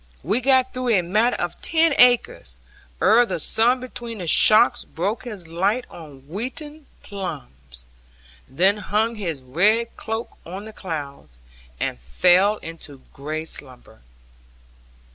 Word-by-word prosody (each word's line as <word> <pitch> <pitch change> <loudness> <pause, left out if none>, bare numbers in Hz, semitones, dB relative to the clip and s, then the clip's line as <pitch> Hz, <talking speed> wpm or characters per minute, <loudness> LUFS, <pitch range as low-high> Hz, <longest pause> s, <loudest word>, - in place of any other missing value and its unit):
We 205 - 0
got 260 0 +3
through 255 -1 -3
a 180 - +2
matter 215 +8 +1
of - - -5
ten 325 -1 +2
acres, 155 - +3 0.4
ere 225 +4 +5
the 240 - -3
sun 240 +3 +2
between 240 -2 -8
the 180 - -6
shocks 220 +8 +5
broke 200 +9 -4
his 205 -8 -8
light 195 +9 -1
on 150 -5 -12
wheaten 280 - -6 0.2
plumes, 65 - -8 0.6
then 190 +9 +2
hung 215 +3 -1
his 170 - -5
red 210 - +1
cloak 225 +1 -6
on 190 +5 -8
the 220 - -10
clouds, 145 - -7 0.4
and 60 - -3
fell 180 - +3
into 155 -5 -10
grey 155 +3 -5
slumber. 130 - -6
200 Hz, 130 wpm, -22 LUFS, 155-235 Hz, 0.6 s, ere